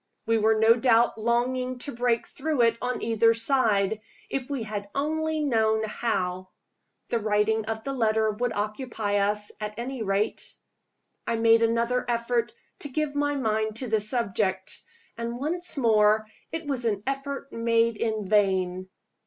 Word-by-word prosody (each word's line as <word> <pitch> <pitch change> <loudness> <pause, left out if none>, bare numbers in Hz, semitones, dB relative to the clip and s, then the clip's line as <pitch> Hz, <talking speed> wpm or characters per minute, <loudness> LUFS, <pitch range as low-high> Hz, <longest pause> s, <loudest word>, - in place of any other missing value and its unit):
We 225 0 +2
were 220 +1 +3
no 225 +2 +5
doubt 235 -2 +3
longing 250 +2 0
to 285 - -4
break 235 -1 0
through 295 -3 -1
it 230 -1 +3
on 250 0 -2
either 230 0 +3
side 220 -5 +1 0.3
if 265 -1 -3
we 275 -5 -2
had 205 -2 -5
only 315 +2 -1
known 220 -6 +2
how. 185 -4 -2 0.6
The 235 - +1
writing 215 +1 +1
of 220 0 -4
the 275 - -3
letter 220 -3 +2
would 240 +3 -2
occupy 210 -1 -2
us, 205 +1 +1
at 210 0 -4
any 250 +1 -4
rate. 200 +1 -2 0.7
I - - +1
made 225 0 +4
another 235 +2 +1
effort 235 0 0 0.3
to 290 - -5
give 305 +1 -2
my 290 0 0
mind 220 -4 -1
to 255 +2 -3
the 220 0 +2
subject 200 -4 -1 0.4
and 235 +1 -3
once 340 +5 -1
more 215 -3 +4 0.3
it 325 0 -4
was 270 -4 -2
an 205 -3 -1
effort 275 +1 -4
made 230 -1 +1
in 220 -3 -2
vain. 185 -2 +1
230 Hz, 155 wpm, -26 LUFS, 215-255 Hz, 0.7 s, no